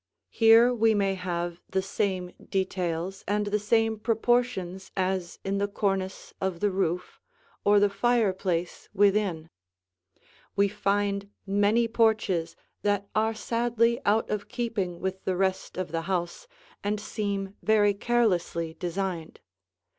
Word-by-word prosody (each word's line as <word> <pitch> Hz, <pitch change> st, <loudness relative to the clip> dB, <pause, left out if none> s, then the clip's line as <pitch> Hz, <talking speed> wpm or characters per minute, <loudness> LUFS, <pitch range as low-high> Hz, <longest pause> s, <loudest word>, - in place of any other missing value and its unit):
Here 230 Hz, +2 st, +6 dB
we 225 Hz, -2 st, +3 dB
may 195 Hz, -1 st, +2 dB
have 175 Hz, -2 st, -3 dB
the 190 Hz, 0 st, 0 dB
same 185 Hz, -2 st, -2 dB, 0.2 s
details 185 Hz, -1 st, -2 dB
and 210 Hz, +1 st, +1 dB
the 205 Hz, +1 st, 0 dB
same 225 Hz, +1 st, +1 dB
proportions 225 Hz, -5 st, 0 dB
as 185 Hz, -2 st, -1 dB
in 195 Hz, +1 st, 0 dB
the 200 Hz, -, +1 dB
cornice 195 Hz, -2 st, -2 dB
of 190 Hz, -3 st, -1 dB
the 205 Hz, +1 st, +1 dB
roof, 180 Hz, -2 st, -2 dB, 0.4 s
or 205 Hz, 0 st, +5 dB
the 205 Hz, -, +5 dB
fireplace 195 Hz, -5 st, 0 dB
within. 195 Hz, -5 st, +2 dB, 1.0 s
We 200 Hz, 0 st, +3 dB
find 200 Hz, 0 st, 0 dB, 0.2 s
many 205 Hz, +4 st, +2 dB
porches 220 Hz, -7 st, +1 dB, 0.3 s
that 205 Hz, -1 st, 0 dB
are 220 Hz, +1 st, +1 dB
sadly 235 Hz, +1 st, +1 dB
out 215 Hz, +2 st, +2 dB
of 210 Hz, -1 st, -3 dB
keeping 205 Hz, -8 st, -2 dB
with 190 Hz, +1 st, -3 dB
the 185 Hz, -, 0 dB
rest 190 Hz, -1 st, -1 dB
of 185 Hz, -4 st, -3 dB
the 165 Hz, 0 st, -1 dB
house 185 Hz, -, -3 dB, 0.4 s
and 205 Hz, +1 st, -1 dB
seem 200 Hz, -2 st, -3 dB
very 210 Hz, -2 st, +4 dB
carelessly 195 Hz, -7 st, 0 dB
designed. 180 Hz, -2 st, -3 dB
200 Hz, 130 wpm, -27 LUFS, 185-215 Hz, 1.0 s, Here